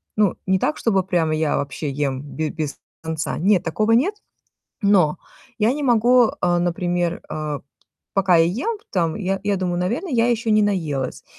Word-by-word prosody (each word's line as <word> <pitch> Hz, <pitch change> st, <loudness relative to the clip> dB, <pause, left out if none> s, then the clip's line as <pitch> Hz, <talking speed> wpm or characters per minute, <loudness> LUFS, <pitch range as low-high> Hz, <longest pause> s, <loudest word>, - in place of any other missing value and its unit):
Ну, 210 Hz, -4 st, +2 dB
не 190 Hz, 0 st, +3 dB
так, 150 Hz, -, 0 dB
чтобы 195 Hz, -5 st, +1 dB
прямо 170 Hz, -4 st, 0 dB
я 155 Hz, -1 st, 0 dB
вообще 145 Hz, +1 st, -3 dB
ем 135 Hz, -2 st, -2 dB
б 155 Hz, +2 st, -4 dB
без 155 Hz, -3 st, -4 dB, 0.3 s
конца, 160 Hz, -1 st, -3 dB
нет, 190 Hz, +1 st, +3 dB
такого 215 Hz, +7 st, 0 dB
нет, 270 Hz, -, +3 dB, 0.7 s
но 185 Hz, -6 st, +4 dB, 0.4 s
я 220 Hz, +2 st, +3 dB
не 295 Hz, +2 st, -3 dB
могу, 245 Hz, -1 st, +4 dB
а, 175 Hz, 0 st, +3 dB
например, 175 Hz, 0 st, -1 dB
а, 150 Hz, -2 st, -4 dB, 0.5 s
пока 190 Hz, -2 st, +4 dB
я 165 Hz, -, +5 dB
ем, 260 Hz, -, -2 dB
там, 170 Hz, -3 st, 0 dB
я 195 Hz, -2 st, -2 dB
я 205 Hz, -1 st, +1 dB
думаю, 180 Hz, -2 st, -1 dB
наверное, 240 Hz, -, -2 dB
я 235 Hz, -1 st, +3 dB
еще 235 Hz, -1 st, 0 dB
не 215 Hz, 0 st, +4 dB
наелась 155 Hz, -10 st, -2 dB
180 Hz, 175 wpm, -21 LUFS, 160-215 Hz, 0.7 s, я